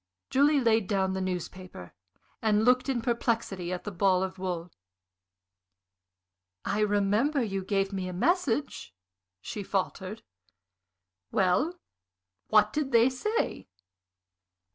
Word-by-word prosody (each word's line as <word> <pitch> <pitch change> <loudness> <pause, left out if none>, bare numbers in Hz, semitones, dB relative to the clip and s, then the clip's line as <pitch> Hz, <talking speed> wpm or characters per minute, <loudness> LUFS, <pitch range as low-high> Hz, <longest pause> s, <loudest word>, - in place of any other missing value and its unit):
Julie 285 +2 +4
laid 225 -5 +2
down 190 -2 0
the 190 - -2
newspaper 180 - -6 0.5
and 215 -1 +2
looked 250 +2 +3
in 250 -3 0
perplexity 230 -7 -1
at 180 - -4
the 205 - -5
ball 185 0 +2
of 190 0 -5
wool. 180 -2 -4 1.9
"I 210 - -1
remember 210 +7 +2
you 195 -3 -3
gave 195 0 0
me 190 -1 -3
a - - -4
message," 280 - -1 0.5
she 210 - -5
faltered. 195 +1 -3 1.1
"Well, 225 - +1 0.7
what 215 -1 +4
did 295 -3 -1
they 235 +2 +5
say?" 425 - -2
205 Hz, 115 wpm, -28 LUFS, 185-245 Hz, 1.9 s, they